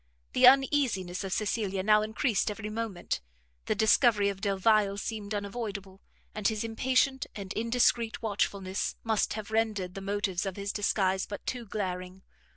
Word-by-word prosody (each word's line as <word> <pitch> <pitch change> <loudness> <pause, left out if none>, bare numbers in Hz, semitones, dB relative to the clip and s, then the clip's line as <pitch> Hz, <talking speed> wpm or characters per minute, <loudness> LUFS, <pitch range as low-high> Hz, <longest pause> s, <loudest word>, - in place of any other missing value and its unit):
The 250 - +7
uneasiness 255 -10 +3
of 195 - -5
Cecilia 200 -2 -1
now 210 +1 +5
encreased 220 +1 0
every 210 0 -5
moment; 215 - -3 0.4
the - - 0
discovery 215 -1 +4
of 195 -1 -6
Delvile 200 0 +2
seemed 210 0 -5
unavoidable, 200 -2 -5 0.3
and 215 -1 0
his 220 -1 -1
impatient 255 +3 +1
and 195 -2 -6
indiscreet 230 0 +1
watchfulness 200 -3 -1
must 220 -2 +1
have 215 0 -6
rendered 215 -5 0
the 195 - -7
motives 195 -1 -1
of 190 - -4
his 200 0 -4
disguise 190 -2 +1
but 205 - -7
too 245 -3 -4
glaring. 185 -2 -4
205 Hz, 150 wpm, -29 LUFS, 195-225 Hz, 0.4 s, The